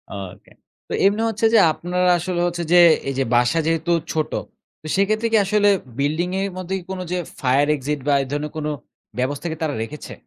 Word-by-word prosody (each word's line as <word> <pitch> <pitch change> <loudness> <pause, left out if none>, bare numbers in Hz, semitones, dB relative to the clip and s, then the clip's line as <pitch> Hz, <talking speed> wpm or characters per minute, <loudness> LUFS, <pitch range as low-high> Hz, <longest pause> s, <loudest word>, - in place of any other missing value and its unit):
ওকে, 95 -2 -9 0.4
তো - - -6
এমনি 205 +3 +3
হচ্ছে 220 0 -1
যে 225 - +7
আপনারা 180 +3 0
আসলে 175 0 -2
হচ্ছে 175 0 -3
যে - - +7 0.3
এই - - -2
যে - - +3
বাসা 125 +7 +3
যেহেতু 165 +1 0 0.2
ছোট। 155 -1 -1 0.5
তো - - -7
সেক্ষেত্রে 215 +4 +1
কি 225 - +5
আসলে 205 +1 +3 0.3
বিল্ডিং 155 +5 0
এর 200 - -1
মধ্যে 185 +1 -3 0.2
কোনো 185 -1 -4
যে 180 - 0 0.2
ফায়ার 135 +2 +2
এক্সিট 145 +1 -3
বা 145 - +4
এই 135 - -8
ধরনের 145 +1 -3
কোনো 150 -1 -2 0.5
ব্যবস্থা 140 +5 -2
কি - - -3
তারা 155 -3 -1
রেখেছে? 150 +6 -8
165 Hz, 195 wpm, -21 LUFS, 145-185 Hz, 0.5 s, যে